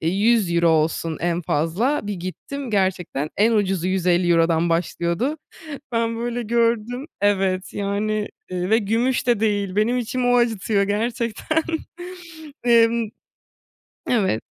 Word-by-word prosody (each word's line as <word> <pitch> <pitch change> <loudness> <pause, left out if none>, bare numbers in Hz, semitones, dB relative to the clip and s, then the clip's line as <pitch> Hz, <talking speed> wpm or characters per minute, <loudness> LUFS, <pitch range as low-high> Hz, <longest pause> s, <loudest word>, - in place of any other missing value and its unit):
eee, 160 - 0
€100 190 -4 +2
olsun 160 0 +1
en 175 +1 0
fazla, 195 - 0
bir 205 - -2
gittim 230 +9 -6
gerçekten 185 -7 -1
en 225 +3 +3
ucuzu 190 -4 +1
€150'dan 175 -2 +2
başlıyordu. 170 - -1 0.6
Ben 230 0 0
böyle 240 +1 -2
gördüm, 235 +3 0 0.2
evet, 195 -2 +1
yani, 205 +1 -1 0.2
ııı, 180 +1 -2
ve 220 - +5
gümüş 235 +4 0
de 235 -4 +3
değil, 205 -3 0
benim 230 +4 +2
içimi 245 +1 -1
o 245 - +4
acıtıyor 220 -3 +1
gerçekten. 230 +8 -1 1.0
Imm 230 -1 +4 1.0
Evet. 195 - +1
205 Hz, 120 wpm, -22 LUFS, 180-235 Hz, 1.0 s, ve